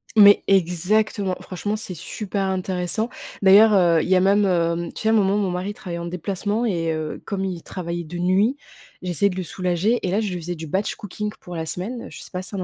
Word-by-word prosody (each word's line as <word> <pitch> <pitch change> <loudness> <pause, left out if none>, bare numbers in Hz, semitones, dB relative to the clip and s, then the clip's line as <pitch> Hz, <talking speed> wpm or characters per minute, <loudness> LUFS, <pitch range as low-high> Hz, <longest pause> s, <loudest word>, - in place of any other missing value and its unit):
Mais 205 -1 +8
exactement. 190 +2 +2
Franchement 205 +3 -3
c'est 210 -4 -4
super 200 +4 -4
intéressant. 190 +3 0 0.3
D'ailleurs, 205 +3 +7
heu, 170 -4 +4
il - - -3
y 190 - +5
a 185 - +5
même, 200 +2 +4
heu, 170 -2 0
tu - - -6
sais 220 - +2
un - - +4
moment 205 -2 +3
mon 195 -3 0
mari 185 +3 -3
travaillait 170 -4 -6
en 170 - -5
déplacement 200 +6 -2
et 170 -7 0
heu, 155 -1 -4
comme 195 -2 -3
il 180 -3 -4
travaillait 170 -2 -5
de 175 +3 -7
nuit, 195 +9 +2 0.4
j'essayais 180 +2 +1
de 180 - -5
le 185 - -3
soulager 185 +7 0
et - - 0
là, 205 - +2
je 200 -4 -2
lui 180 - -4
faisais 175 +2 -4
du 160 - -7
batch 190 +7 -1
cooking 210 +1 -5
pour 175 -1 -9
la 160 - -3
semaine, 190 +10 -4
je - - -10
sais - - -11
pas 180 - -3
si 185 - -3
t'en 195 -3 -4
as - - -1
185 Hz, 240 wpm, -22 LUFS, 175-205 Hz, 0.4 s, Mais